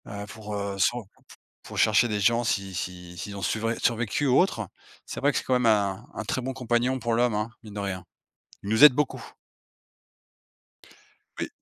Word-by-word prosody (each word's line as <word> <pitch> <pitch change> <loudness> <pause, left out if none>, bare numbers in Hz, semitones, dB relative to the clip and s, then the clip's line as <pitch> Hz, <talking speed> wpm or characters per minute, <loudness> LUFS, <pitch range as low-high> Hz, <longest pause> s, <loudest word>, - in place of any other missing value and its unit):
Heu, 100 0 -6
pour 105 0 -7
heu, 100 -1 -3
se 110 +5 +3
re 120 - -4
p 95 - -26 0.5
pour - - -11
rechercher 110 +2 +4
des 105 -2 -1
gens, 115 +4 +3
si 100 -4 -1
si 90 0 -6
s'ils 100 +4 -6
ont 100 - -6
suvré 115 +5 -1
survécu 120 +4 0
ou 130 - +5
autre. 115 - +1 0.4
C'est - - -6
vrai 145 +2 +3
que - - -2
c'est - - -1
quand 130 - 0
même 125 -1 +2
un 100 -4 +2
un - - -4
très 130 - -1
bon 130 +1 -3
compagnon 125 0 0
pour 120 -1 -1
l'homme, 120 -1 +2
hein, 105 +2 -1
mine 105 -2 -11
de - - -3
rien. 95 -3 -4 0.6
Il 100 - -5
nous 110 +5 +4
aide 150 -3 +11
beaucoup. 145 +1 -1 2.2
Oui. - - -1
110 Hz, 205 wpm, -26 LUFS, 100-120 Hz, 2.2 s, aide